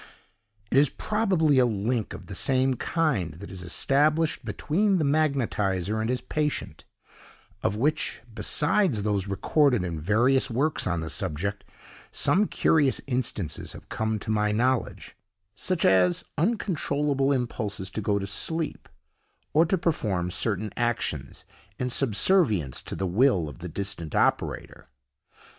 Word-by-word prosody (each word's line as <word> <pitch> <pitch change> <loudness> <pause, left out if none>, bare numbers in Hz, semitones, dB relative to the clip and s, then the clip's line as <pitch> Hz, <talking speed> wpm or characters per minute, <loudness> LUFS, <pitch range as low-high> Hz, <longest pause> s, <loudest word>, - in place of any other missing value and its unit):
It 135 - +5
is 145 -1 +4
probably 185 -10 +1
a 125 - +5
link 110 0 -2
of 90 0 -11
the 100 - -8
same 130 +6 +2
kind 125 - -1
that 85 - -10
is 95 -1 -7
established 150 - +1
between 195 +6 0
the 160 - +1
magnetiser 110 - 0
and 110 - -2
his 125 0 -1
patient, 150 -1 -3 0.8
of 100 - 0
which, 140 +4 0
besides 140 - +2
those 100 -2 -1
recorded 125 - +2
in 85 -3 -3
various 120 - +2
works 140 +6 0
on 85 -2 -1
the 80 - -5
subject, 95 +6 -3 0.5
some 205 +3 +2
curious 145 -5 +2
instances 120 - -3
have - - -13
come 110 0 -1
to 105 +1 -4
my 105 -1 +1
knowledge, 125 +3 -1 0.4
such 180 - -1
as 90 -2 +4
uncontrollable 150 - 0
impulses 110 -7 -2
to 110 - -4
go 100 0 +1
to 100 - -3
sleep, 160 +10 -3 0.6
or 160 +2 +4
to 190 - +1
perform 105 - -1
certain 105 +1 -1
actions, 95 - -2 0.3
in 125 0 -2
subservience 110 - +2
to - - -7
the 95 - -2
will 95 - +2
of 75 - -10
the 90 +1 -6
distant 95 -3 -4
operator. - - -1
120 Hz, 140 wpm, -26 LUFS, 100-150 Hz, 0.8 s, It